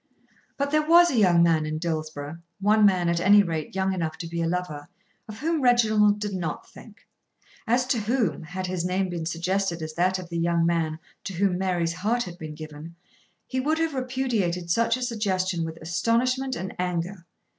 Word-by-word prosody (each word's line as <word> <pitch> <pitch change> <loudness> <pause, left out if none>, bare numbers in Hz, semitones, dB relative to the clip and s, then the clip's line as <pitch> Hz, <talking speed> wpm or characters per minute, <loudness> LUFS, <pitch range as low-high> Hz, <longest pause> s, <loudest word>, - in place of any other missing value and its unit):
But 280 0 -1
there 305 0 +4
was 340 +3 +6
a - - -1
young 175 -4 +5
man 165 -2 +3
in 155 0 -3
Dillsborough, 155 -2 -4 0.2
one 210 +1 +5
man 180 -3 +2
at 170 0 +1
any 205 +3 +6
rate 165 -2 -4
young 190 0 +1
enough 165 -4 -3
to 170 - -6
be 170 0 -3
a 165 - 0
lover, 165 -4 -3 0.4
of 215 -1 -8
whom 325 0 0
Reginald 215 -4 +4
did 205 -1 -3
not 170 -5 -4
think; 225 +1 -15 0.7
as 245 +2 +2
to 250 -2 0
whom, 215 - 0
had 180 +3 -5
his 180 -2 -2
name 185 +1 0
been 170 -2 -4
suggested 175 +1 -1
as 155 0 -5
that 185 +3 +1
of 180 -2 -8
the 170 -1 -3
young 170 0 +2
man 165 -2 0 0.3
to 195 - -4
whom 185 0 +1
Mary's 175 -3 0
heart 220 +7 0
had 175 0 -9
been 155 -1 -7
given, 155 +1 -9 0.5
he 260 - -3
would 305 +5 +1
have 325 -1 0
repudiated 240 -10 -1
such 230 +4 +2
a 255 - -4
suggestion 190 -7 -1
with 160 0 -5
astonishment 250 +10 0
and 190 -5 -5
anger. 180 0 -3
185 Hz, 195 wpm, -25 LUFS, 170-225 Hz, 0.7 s, was